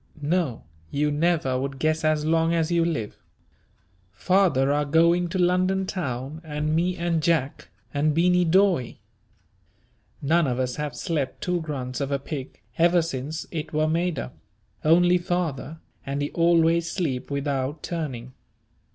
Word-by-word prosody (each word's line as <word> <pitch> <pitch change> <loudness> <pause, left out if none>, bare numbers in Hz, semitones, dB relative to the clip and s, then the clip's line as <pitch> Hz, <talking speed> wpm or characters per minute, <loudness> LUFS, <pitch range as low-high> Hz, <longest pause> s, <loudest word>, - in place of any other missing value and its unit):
No 155 -6 0 0.3
you 150 +1 0
never 150 -4 +1
would 135 +1 -4
guess 155 +2 0
as 155 -1 +1
long 165 +1 +2
as 165 0 0
you 170 -1 +3
live 155 -11 -2 0.9
father 145 - +2
are 145 +1 +2
going 170 +4 +3
to 190 - -3
London 185 +1 +2
town, 140 -4 -4
and 155 0 -2
me, 180 +2 0
and 170 -1 0
Jack, 155 -4 0 0.3
and 150 +2 +2
Beany 180 +3 +3
Dawe. 175 -6 +2 1.2
None 160 +2 +2
of 125 -2 -1
us 125 -1 -2
have 150 -4 -4
slept 145 0 -3
two 180 -1 -1
grunts 135 -4 -4
of 140 0 -2
a 140 - +2
pig, 135 -3 -7 0.2
ever 170 0 +4
since 155 0 -4
it 160 -2 -5
were 155 +1 +2
made 170 0 0
up, 65 - -6 0.5
only 175 +3 +5
father, 165 -4 -3 0.3
and 140 +1 -3
he 145 - -3
always 170 0 +3
sleep 140 -9 -2
without 140 0 -2
turning. 130 -7 -5
155 Hz, 150 wpm, -25 LUFS, 140-170 Hz, 1.2 s, only